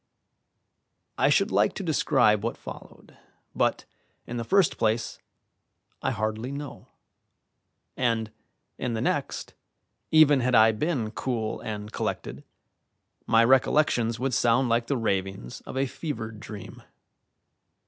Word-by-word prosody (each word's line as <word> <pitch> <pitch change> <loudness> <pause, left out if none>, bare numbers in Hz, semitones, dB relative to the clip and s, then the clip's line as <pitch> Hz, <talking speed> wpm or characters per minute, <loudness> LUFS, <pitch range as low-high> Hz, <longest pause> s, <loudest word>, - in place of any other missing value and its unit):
I - - +3
should - - +3
like - - +2
to - - -4
describe 105 -1 +2
what 115 - -2
followed, - - -12 0.4
but, - - 0 0.4
in 120 - -5
the 115 - -2
first 190 - +2
place, 110 +1 0 0.8
I - - 0
hardly 110 +4 -2
know; 140 0 -7 1.1
and, 115 -3 0 0.5
in 120 -2 -2
the 110 - -2
next, - - -2 0.6
even 155 -3 +6
had 125 0 +1
I 110 0 +7
been 115 -2 -2
cool 115 -3 -3
and 105 -1 -6
collected, 65 +4 -4 0.8
my 115 0 +5
recollections 125 -2 +3
would 130 0 -1
sound 120 +2 +3
like 115 0 +1
the 140 - 0
ravings 95 - -3
of - - -6
a 135 - +2
fevered 115 -7 -6
dream. 105 -1 -9
115 Hz, 125 wpm, -26 LUFS, 110-130 Hz, 1.1 s, I